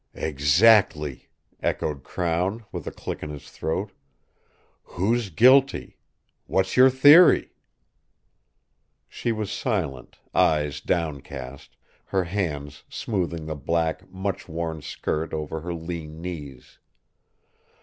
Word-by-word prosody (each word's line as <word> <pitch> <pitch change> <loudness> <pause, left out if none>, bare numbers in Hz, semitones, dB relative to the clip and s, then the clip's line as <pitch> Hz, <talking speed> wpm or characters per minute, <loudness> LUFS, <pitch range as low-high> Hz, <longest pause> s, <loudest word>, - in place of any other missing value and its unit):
"Exactly," 75 - +3 0.3
echoed 75 -3 -2
Crown, 90 +6 -2
with - - -6
a - - -3
click - - -6
in 75 - -5
his 75 -2 -9
throat. 95 +5 -3 0.9
"Who's 110 +4 -1
guilty? 130 - +4 0.5
What's 95 0 0
your 130 +1 +8
theory?" 145 +7 +7 1.6
She 120 - -3
was 110 -3 -3
silent, 80 - -3 0.2
eyes 75 -2 +2
downcast, 70 -4 -4 0.3
her 95 -1 0
hands 75 -6 -4
smoothing 85 -7 -3
the 80 - -3
black, 80 +2 -2
much 95 +1 -4
worn 80 -1 -4
skirt 80 +2 -3
over 80 +1 -4
her 90 +2 -5
lean 80 -2 -6
knees. 75 -7 -8
85 Hz, 105 wpm, -25 LUFS, 75-100 Hz, 1.6 s, your